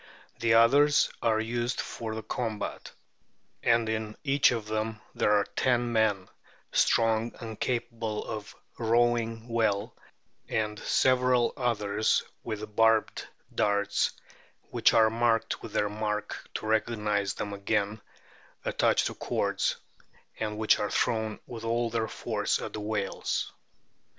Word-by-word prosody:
The 115 -1 +3
others 145 +6 +5
are 110 -1 +2
used 120 +2 -2
for 110 -2 -4
the 110 - -5
combat, 110 -1 -4 0.7
and 115 -1 +3
in 110 -1 -3
each 140 -1 +4
of 115 -3 -2
them 110 0 -2 0.2
are 105 -1 +4
ten 120 -2 +1
men, 105 -4 +2 0.4
strong 115 0 +2
and 110 -2 -7
capable 115 -3 -2
of 105 -1 -6 0.2
rowing 115 0 +1
well, 110 -1 0 0.5
and 105 -1 -1
several 125 -2 +3
others 110 -5 +1 0.2
with 110 -1 -6
barbed 115 0 +3 0.3
darts, 100 -1 +1 0.6
which - - +4
are 110 -1 +5
marked 115 -1 +1
with - - -9
their 105 - +2
mark 105 0 -4
to - - -3
recognise 105 -2 0
them 105 -1 -4
again, 100 +1 -1 0.6
attached - - +2
to - - -2
cords, - - -1 0.6
and 105 -1 -2
which 110 0 +3
are 105 - -1
thrown 110 -2 0
with 115 -2 -8
all 115 0 0
their 115 -1 0
force - - -1
at - - -6
the 105 - -4
whales." 105 -2 -2
110 Hz, 125 wpm, -28 LUFS, 105-115 Hz, 0.7 s, others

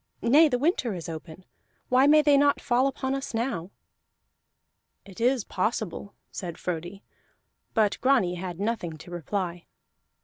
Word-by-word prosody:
Nay, 295 +7 +6
the 250 - +1
winter 255 - 0
is 170 - -7
open: 165 +2 -9 0.4
why 255 +2 +5
may 305 +1 +6
they 290 -1 +5
not 285 0 +4
fall 250 +2 +2
upon 265 -1 -2
us 275 -3 -4
now?" 225 -7 -2 1.4
"It 195 +2 -11
is 250 -1 +2
possible," 200 -1 -3 0.2
said 175 -3 -6
Frodi, 180 +3 -5 0.7
but 215 -3 +2
Grani 250 -9 +3
had 180 -1 -6
nothing 200 -7 -2
to 165 +3 -13
reply. 175 0 -4
215 Hz, 140 wpm, -26 LUFS, 175-265 Hz, 1.4 s, Nay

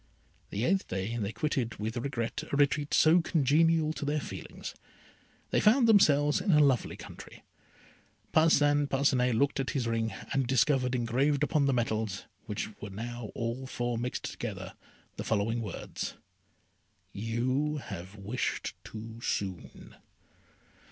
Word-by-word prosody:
The 105 +5 -1
eighth 190 +4 +1
day 95 +5 -3
they 105 -2 -2
quitted 120 -1 -1
with 110 +2 -4
regret 120 -2 -2
a - - 0
retreat 145 +1 +2
so 165 +3 +5
congenial 160 0 +3
to - - -6
their 145 +1 0
feelings. - - -7 0.8
They - - +3
found 230 +3 +5
themselves 150 -9 +5
in 205 - -3
a 155 -5 +6
lovely 135 -5 +3
country. - - -11 0.9
Parcin 145 -2 +4
Parcinet 130 -3 +2
looked 140 +3 +1
at 135 - -1
his 125 - 0
ring, 115 -1 0 0.2
and 135 -2 +1
discovered 130 0 +2
engraved 130 +5 +1
upon 145 -1 +2
the - - +3
metals, 110 -4 -1 0.2
which 105 -1 -3
were 105 - -6
now 115 +2 -6
all 120 +3 -3
four 120 -1 -2
mixed 125 +1 -3
together, - - -5 0.4
the - - -3
following 115 +2 0
words: 105 -5 -5 1.0
"You 130 +8 -1
have 95 -6 -7
wished 105 +5 -3
too 110 +1 -9
soon." 95 -6 -4
125 Hz, 140 wpm, -30 LUFS, 115-145 Hz, 1.0 s, a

